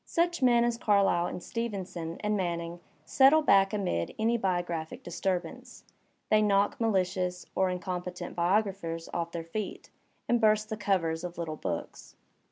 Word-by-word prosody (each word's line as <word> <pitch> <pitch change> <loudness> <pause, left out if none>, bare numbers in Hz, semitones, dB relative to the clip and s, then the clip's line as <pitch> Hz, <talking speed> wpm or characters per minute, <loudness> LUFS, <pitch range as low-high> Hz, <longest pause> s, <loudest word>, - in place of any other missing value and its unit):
Such 340 -1 0
men 240 -2 +5
as 235 -1 0
Carlyle 200 -5 +3
and 180 - -6
Stevenson 190 -8 -4
and 210 0 0
Manning 170 -2 -3 0.3
settle 280 +4 +5
back 195 -7 +5
amid 185 - -2
any 225 +2 +2
biographic 175 -6 -2
disturbance. 175 0 -4 0.5
They 215 0 +5
knock 205 +1 +2
ma 225 - +3
Hdous 180 -1 -1
or 190 -1 +2
incompetent 180 -1 -4
biographers 175 -2 0
off 170 0 -2
their 170 -1 -4
feet, 195 +5 -6 0.4
and 240 0 +2
burst 215 -1 +3
the 220 - -2
covers 180 -5 0
of 175 -1 -6
little 165 -2 -3
books. 85 - -6
190 Hz, 150 wpm, -29 LUFS, 170-215 Hz, 0.5 s, men